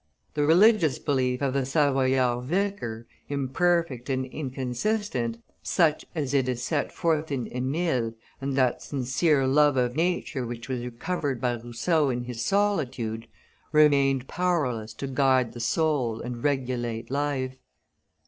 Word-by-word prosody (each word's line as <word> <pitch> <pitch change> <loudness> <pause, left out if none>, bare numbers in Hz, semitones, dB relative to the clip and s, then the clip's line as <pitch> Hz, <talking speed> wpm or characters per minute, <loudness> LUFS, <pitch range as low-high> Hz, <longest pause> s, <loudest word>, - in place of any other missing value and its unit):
The 145 -1 +1
religious 180 - +5
belief 130 -2 0
of 135 -2 +1
the 135 -1 +1
Savoyard 130 -3 +2
vicar, 170 - -2 0.2
imperfect 140 -1 0
and 130 -1 0
inconsistent, 130 - -2 0.2
such 160 -4 +2
as 145 -4 -2
it 135 -2 +2
is 125 -1 -2
set 145 0 -1
forth 160 -2 0
in 130 -4 -2
Emile, 130 -3 -1 0.3
and 135 0 -2
that 130 -2 +2
sincere 135 +2 +1
love 145 +1 +4
of 125 0 +1
nature 165 -5 0
which 120 0 -6
was 125 -2 -3
recovered 135 +2 -3
by 125 0 0
Rousseau 120 +6 0
in 120 -1 -2
his 120 -1 -5
solitude, 130 - 0 0.4
remained 140 -4 +4
powerless 130 -12 -1
to - - -5
guide 130 -2 +2
the 120 - -8
soul 125 -2 0
and 120 -1 -6
regulate 125 -4 -1
life. 135 -2 -1
135 Hz, 135 wpm, -26 LUFS, 125-150 Hz, 0.4 s, religious